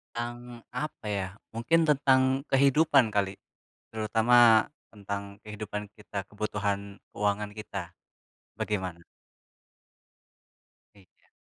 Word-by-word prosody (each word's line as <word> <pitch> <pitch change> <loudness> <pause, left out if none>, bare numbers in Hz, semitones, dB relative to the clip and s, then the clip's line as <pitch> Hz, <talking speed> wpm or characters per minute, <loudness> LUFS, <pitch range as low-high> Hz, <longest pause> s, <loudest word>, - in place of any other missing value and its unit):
Tentang 120 0 -6
apa 150 -3 -5
ya? 100 -2 -1 0.3
Mungkin 160 +9 +2
tentang 135 -2 +3
kehidupan 135 -3 +4
kali, 100 -1 0 0.5
terutama 110 +1 +5 0.2
tentang 100 0 -6
kehidupan 105 -1 -6
kita, 105 -1 -5
kebutuhan 100 -1 -3
keuangan 105 0 -1
kita. 100 -4 -6 0.6
Bagaimana? 95 -5 -3 1.9
Iya. 95 -2 -24
105 Hz, 85 wpm, -28 LUFS, 100-120 Hz, 1.9 s, terutama